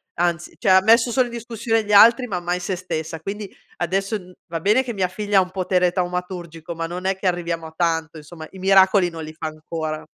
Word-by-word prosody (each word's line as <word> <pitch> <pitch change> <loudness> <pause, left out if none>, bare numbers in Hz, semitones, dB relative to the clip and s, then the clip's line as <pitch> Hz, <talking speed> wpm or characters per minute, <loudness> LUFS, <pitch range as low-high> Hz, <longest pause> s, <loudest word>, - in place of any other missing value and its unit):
Anzi 175 -1 -1
cioè 215 - 0
ha 185 0 +7
messo 230 +3 +4
solo 255 +1 +2
in 240 - -10
discussione 230 -1 -1
gli 210 - -5
altri 230 +5 +7
ma 185 -6 -2
mai 175 +1 -2
se 185 +1 -3
stessa. 165 -3 -5
Quindi 200 +5 -5 0.3
adesso 195 +5 -1
n 185 -2 -14
va 165 -1 -4
bene 210 +9 +3
che 245 -2 -5
mia 190 -3 0
figlia 205 +2 -1
ha - - +7
un 180 0 -4
potere 180 -1 +1
taumaturgico 175 -2 -4
ma 165 0 -3
non 180 +2 -6
è 190 0 +1
che 190 0 -3
arriviamo 170 -2 -2
a 160 - -14
tanto 165 -1 -1
insomma, 155 +1 -10
i 190 - -12
miracoli 190 -1 +4
non 165 -1 -8
li 155 0 -8
fa 160 - -7
ancora. 155 0 -5
180 Hz, 230 wpm, -22 LUFS, 165-200 Hz, 0.3 s, ha